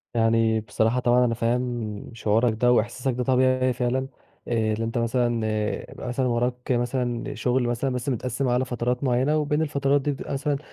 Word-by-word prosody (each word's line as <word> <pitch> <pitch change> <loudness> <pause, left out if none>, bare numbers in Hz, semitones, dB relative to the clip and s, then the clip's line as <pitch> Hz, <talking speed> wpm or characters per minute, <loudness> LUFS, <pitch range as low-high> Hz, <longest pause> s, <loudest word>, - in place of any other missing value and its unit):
يعني 115 -1 +3
بصراحة 110 +3 0
طبعًا 125 0 +3
أنا 115 - +1
فاهم 115 -2 -2
شعورك 115 +1 +1
ده، 120 +3 +2
وإحساسك 125 +3 +1
ده 125 +1 -2
طبيعي 130 0 +2
فعلًا 125 +2 -1 0.4
آآ 110 -2 +1
اللي 110 +1 -2
أنت 115 +2 -3
مثلًا، 120 -1 0 0.5
يبقى - - -8
مثلًا 125 +1 -1
وراك 125 +1 -1
مثلًا 120 +2 -1
شغل 125 0 +1
مثلًا 120 +3 -1
بس 125 +2 -3
متقسم 125 +1 -2
على 125 +1 +1
فترات 125 +1 -2
معينة، 130 +4 +2
وبين 150 0 0
الفترات 140 -2 +1
دي 145 - 0
بتبقى 140 - -5
مثلًا 140 +1 -1
125 Hz, 175 wpm, -25 LUFS, 115-130 Hz, 0.5 s, يعني